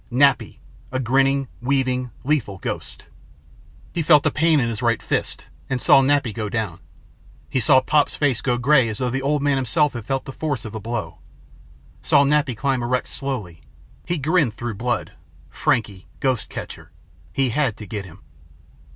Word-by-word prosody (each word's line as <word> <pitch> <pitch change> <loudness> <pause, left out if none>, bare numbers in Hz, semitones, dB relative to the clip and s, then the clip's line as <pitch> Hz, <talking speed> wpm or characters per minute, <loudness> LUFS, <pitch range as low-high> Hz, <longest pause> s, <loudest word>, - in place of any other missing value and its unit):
Nappy. 135 0 +3 0.3
A 130 - -1
grinning, 135 +2 +2
weaving, 130 -1 0
lethal 130 -9 0
ghost. - - -6 0.9
He 170 - -1
felt 150 -2 +5
a - - +3
pain 160 0 +3
in 120 - +1
his 115 0 -4
right 115 -2 +2
fist - - -3 0.2
and 130 -2 -1
saw 135 - +6
Nappy 135 -4 +2
go 105 0 -3
down. 105 -5 -3 0.7
He 130 - +1
saw 130 +2 +5
Pop's 145 +2 +2
face 140 -6 +1
go 125 -2 0
gray 130 -1 +4
as 105 - -4
though 125 0 -1
the 135 +2 -1
old 145 +1 0
man 145 -1 +2
himself 135 +3 +1
had 120 -3 -6
felt 135 -1 -1
the 135 - -7
force 145 -7 -3
of 110 - -7
the 110 - -4
blow. 115 +1 -5 0.8
Saw 140 - +4
Nappy 140 -4 +1
climb 135 0 0
erect 125 +1 -1
slowly. 110 -12 -5 0.4
He 175 0 -2
grinned 150 -5 +1
through 120 -1 -4
blood. 120 +4 -2 0.4
Frankie 100 -5 -1
ghost 130 -4 0
catcher. - - -8 0.4
He 135 -2 +1
had 135 -3 0
to 105 - -8
get 105 0 -5
him. 90 +2 -14
130 Hz, 175 wpm, -22 LUFS, 115-140 Hz, 0.9 s, saw